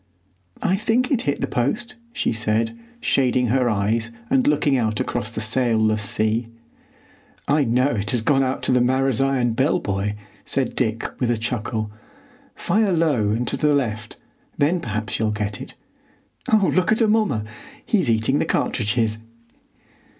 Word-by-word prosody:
"I 190 - +2
think 235 +5 +1
it 250 -4 +2
hit 140 - -2
the - - 0
post," 210 - -2 0.2
she - - -1
said, 110 - -1 0.3
shading 125 -2 +2
her 125 0 +2
eyes 110 +2 0 0.2
and 265 0 +3
looking 145 - +2
out 110 -4 0
across 110 - -2
the 110 -2 -4
sailless 110 -2 +2
sea. 110 +3 0 1.0
"I 145 0 +3
know 125 +4 +2
it 105 -5 -2
has 120 -1 +1
gone 135 +4 +2
out 130 0 -1
to - - +1
the 125 - +4
Marazion 130 -1 +1
Bell 140 +8 +2
buoy," 100 - -2 0.3
said 130 -3 -1
Dick, 115 -2 -1 0.2
with 125 - +1
a 120 - +1
chuckle. 110 -2 -3 0.6
"Fire 205 +2 +1
low 150 - +2
and 115 +4 -1
to - - -1
the 150 -1 +2
left; 110 -6 -3 0.4
then 160 +5 +2
perhaps 110 - -3
you'll 110 -1 +1
get 105 -1 -3
it. - - -10 0.8
Oh, 200 -7 +4
look 185 +2 +2
at 220 - +2
Amomma!—he's 190 - 0
eating 115 +5 +2
the - - +1
cartridges!" 110 -1 0
120 Hz, 155 wpm, -22 LUFS, 110-145 Hz, 1.0 s, the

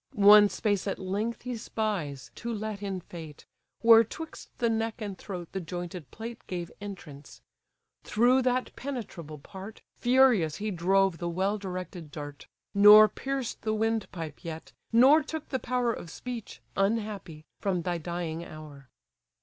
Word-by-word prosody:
One 205 0 +8
space 205 -2 -1
at 195 - -1
length 205 +5 -3
he 250 0 -3
spies, 200 - -3
to 235 - -5
let 215 -2 -4
in 195 -2 -3
fate, 160 -4 -10 0.4
Where 230 0 +8
'twixt 320 +8 -9
the 240 - +1
neck 225 0 -1
and 205 -3 -4
throat 180 -3 -7
the 190 - -3
jointed 175 -2 -6
plate 230 +1 -8
Gave 175 -2 -4
entrance: 165 -8 -9 0.6
through 245 +4 +3
that 255 0 0
penetrable 205 - -6
part 195 +8 -10
Furious 240 - +4
he 210 +1 -3
drove 190 0 +2
the 175 - -2
well 190 +5 0
directed 185 -4 -6
dart: 145 -1 -8 0.3
Nor 210 +1 +9
pierced 270 -3 -4
the 215 0 -1
windpipe 210 -8 -2
yet, 160 -1 -7 0.2
nor 265 +7 +7
took 310 0 -6
the 260 - -1
power 245 -2 0
Of 170 - -8
speech, 240 +4 -7
unhappy! 195 -6 -1
from 185 -4 -1
thy 175 -1 -1
dying 170 0 -4
hour. 150 -5 -11
200 Hz, 150 wpm, -29 LUFS, 170-225 Hz, 0.6 s, Nor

